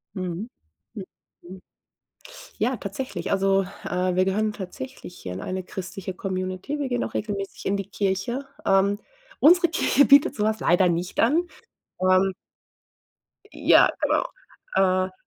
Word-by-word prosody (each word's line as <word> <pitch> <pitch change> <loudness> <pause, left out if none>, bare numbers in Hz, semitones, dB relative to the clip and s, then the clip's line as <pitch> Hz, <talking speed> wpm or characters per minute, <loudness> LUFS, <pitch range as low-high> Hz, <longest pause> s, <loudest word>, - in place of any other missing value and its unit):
Mhm. 185 +4 -4 0.4
Mhm, 205 -4 -6 0.4
mhm. 185 +1 -12 1.0
Ja, 245 +2 0
tatsächlich, 200 -3 -5
also, 195 0 +3 0.2
äh, 180 0 -1
wir 185 0 +3
gehören 210 +2 0
tatsächlich 180 -3 -8
hier 90 - -6
in 95 - -6
eine 185 0 -4
christliche 190 +1 -6
Community, 185 +9 -4
wir 280 - -1
gehen 245 -1 0
auch - - -5
regelmäßig 200 -2 -4
in 200 +1 +1
die 200 0 -6
Kirche. 205 +7 -2 0.2
Ähm, 200 +1 +3 0.4
unsere 345 +3 +6
Kirche 285 -4 +3
bietet 280 0 +6
so 210 - -1
was 215 0 0
leider 180 +2 +3
nicht 175 +2 -2
an. 320 +9 +3 0.5
Ähm 185 +1 +3 1.2
Ja, - - +5
genau. - - +2 0.5
Äh 185 0 +2
195 Hz, 140 wpm, -24 LUFS, 185-220 Hz, 1.2 s, unsere